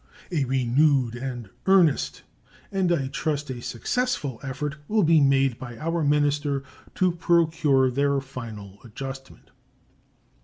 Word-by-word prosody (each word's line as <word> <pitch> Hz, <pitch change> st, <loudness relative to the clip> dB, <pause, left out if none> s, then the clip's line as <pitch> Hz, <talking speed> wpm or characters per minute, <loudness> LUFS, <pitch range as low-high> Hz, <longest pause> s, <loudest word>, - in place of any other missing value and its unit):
A 150 Hz, -6 st, +1 dB
renewed 130 Hz, 0 st, +2 dB
and 120 Hz, -4 st, -6 dB, 0.2 s
earnest, 180 Hz, -7 st, +3 dB, 0.5 s
and 190 Hz, -3 st, +1 dB
I 140 Hz, -6 st, +1 dB
trust 150 Hz, -1 st, -2 dB
a 120 Hz, -2 st, -6 dB
successful, 145 Hz, -, -2 dB
effort 145 Hz, +2 st, -4 dB
will 215 Hz, -1 st, +2 dB
be 160 Hz, -1 st, +5 dB
made 135 Hz, -3 st, +3 dB
by 120 Hz, -2 st, -8 dB
our 165 Hz, +1 st, -1 dB
minister 145 Hz, -1 st, +1 dB, 0.3 s
to 185 Hz, -1 st, +2 dB
procure 160 Hz, -6 st, +2 dB
their 140 Hz, +2 st, +1 dB
final 110 Hz, -7 st, -9 dB
adjustment. 135 Hz, +3 st, -9 dB
140 Hz, 120 wpm, -25 LUFS, 130-160 Hz, 0.5 s, be